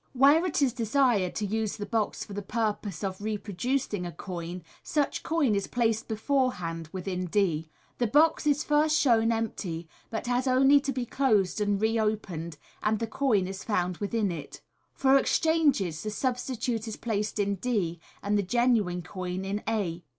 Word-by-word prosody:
Where 285 +7 +5
it 300 -4 +1
is 255 -4 +2
desired 230 -5 +2
to 215 - -1
use 220 +1 -2
the 205 - -4
box 220 -2 -1
for 205 - -10
the 205 - -3
purpose 210 -4 -2
of 190 0 -3
reproducing 210 +1 -2
a 175 - -4
coin, 175 0 -6 0.2
such 295 -2 -1
coin 315 -8 +1
is 200 -1 0
placed 225 -2 0
beforehand 220 - -1
within 185 -1 -3
d. 165 -4 0 0.3
The 240 - +2
box 300 +5 +3
is 295 0 +2
first 300 +1 +3
shown 230 -4 +4
empty, 190 -7 -3 0.2
but 220 - -4
has 245 +2 0
only 270 +2 +6
to 275 0 -2
be 250 -2 -2
closed 215 -6 +1
and 205 -1 +1
re 220 +2 +1
opened, 180 -7 -2 0.2
and 215 +1 +1
the 230 - -2
coin 225 -4 +1
is 190 +1 -6
found 180 -5 -1
within 205 -1 -1
it. 155 -4 -8 0.3
For 270 0 +5
exchanges, 280 - +2
the 215 - -3
substitute 245 -1 -2
is 220 - -5
placed 215 -2 -2
in 200 -1 0
d, 185 -7 -1 0.2
and 205 +1 +1
the - - +3
genuine 205 -4 +1
coin 185 +1 -5
in 200 +2 -2
a. 180 -6 -2
215 Hz, 170 wpm, -28 LUFS, 190-250 Hz, 0.3 s, only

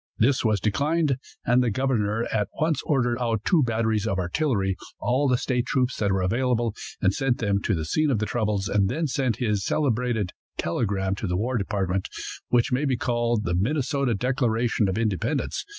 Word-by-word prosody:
This 130 +4 +3
was 110 -3 +2
declined, 140 - +1 0.3
and 120 +1 +4
the 125 - +2
governor 115 -2 0
at 105 -2 +1
once 155 -2 +1
ordered 120 -4 +1
out 115 -3 -1
two 170 -5 +4
batteries 110 -3 0
of 95 - 0
artillery, 95 - 0 0.2
all 130 +4 +1
the 125 -1 +3
state 125 0 -1
troops 130 -1 +1
that 100 -2 +1
were 95 -1 +1
available, 120 +2 +1 0.3
and 95 0 +4
sent 135 -1 0
them 100 -3 0
to 105 - 0
the 80 -2 -3
scene 155 - +1
of 130 - +2
the 110 - -1
troubles, 105 -2 -1
and 100 -2 +2
then 160 +8 -1
sent 130 -5 0
his 105 -5 0
celebrated 120 -8 0 0.3
telegram 95 +1 -1
to 100 +2 -4
the 90 0 0
war 120 +6 -1
department, 95 -3 -1 0.4
which 120 0 +2
may 130 +4 +1
be 130 -3 +1
called 120 -2 0
the 90 - -1
"Minnesota 135 - 0
Declaration 120 -2 +1
of 95 - -2
Independence." 115 - -1
115 Hz, 185 wpm, -25 LUFS, 100-130 Hz, 0.4 s, and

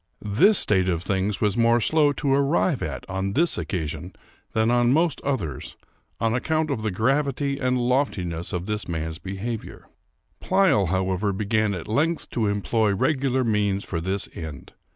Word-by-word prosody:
This 205 - +5
state 95 -3 +3
of 85 -1 -1
things 95 +1 -1
was 105 -2 +2
more 115 0 +4
slow 150 +5 +3
to 140 -1 0
arrive 140 +2 +2
at 70 -4 -5
on 95 +1 -2
this 165 +5 +2
occasion 80 -7 -4 0.4
than 110 +1 +2
on 120 0 +3
most 160 +1 +1
others, 100 - -3 0.4
on 115 0 +1
account 155 +4 0
of 125 -6 -2
the 110 - -1
gravity 140 +6 0
and 125 -1 +1
loftiness 100 - -1
of 90 0 -3
this 105 0 -3
man's 80 -1 -4
behavior. 100 +5 -6 0.5
Pleyel, 185 - +3
however, 95 +3 0
began 105 +1 0
at 85 - -7
length 155 +9 0
to 110 -3 0
employ 105 +1 +1
regular 130 +2 +1
means 105 -3 0
for 80 -3 -4
this 95 +3 -2
end. 80 -4 -8
110 Hz, 160 wpm, -24 LUFS, 95-135 Hz, 0.5 s, This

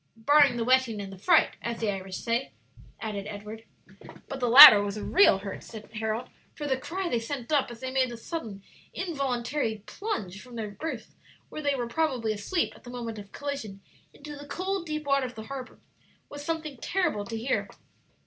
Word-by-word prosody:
"Barring 285 +2 +5
the 230 - 0
wetting 255 -4 +3
and 195 -1 -6
the - - -10
fright, - - +3
as 235 -1 -4
the 220 -2 0
Irish 190 -1 -6
say," 235 +3 -2 0.5
added 205 -2 -5
Edward. 215 +2 -8 0.6
"But 270 -2 -6
the 245 -2 0
latter 245 -4 +12
was 205 0 -3
a 210 - -5
real 375 - +5
hurt," 195 0 -7
said 215 -2 -11
Harold; 220 +1 -3 0.3
"for 295 - -5
the 270 -2 +1
cry 360 +8 -4
they 240 -8 0
sent 245 +3 -6
up 285 -5 +2
as 235 -1 -10
they 260 0 -4
made 260 -1 +2
the 240 - -7
sudden, 225 - -6 0.3
involuntary 265 - -2
plunge 210 - -5
from 250 -1 -13
their 215 -3 -4
berths, 315 +11 -6 0.4
where 305 - -6
they 285 -1 +1
were 245 -2 -2
probably 245 -5 0
asleep 215 - -1
at - - -18
the 245 - -11
moment 235 -3 -6
of 200 -1 -12
collision, 275 -9 -5 0.3
into 295 +1 -10
the 285 0 -11
cold, 370 +3 -3
deep 305 -1 -4
water 275 -2 +2
of 250 - -12
the 220 - -7
harbor, 260 +1 -8 0.5
was 290 0 -8
something 310 -3 -4
terrible 295 - -1
to 225 +2 -5
hear." 235 +4 -1
245 Hz, 195 wpm, -27 LUFS, 215-290 Hz, 0.6 s, latter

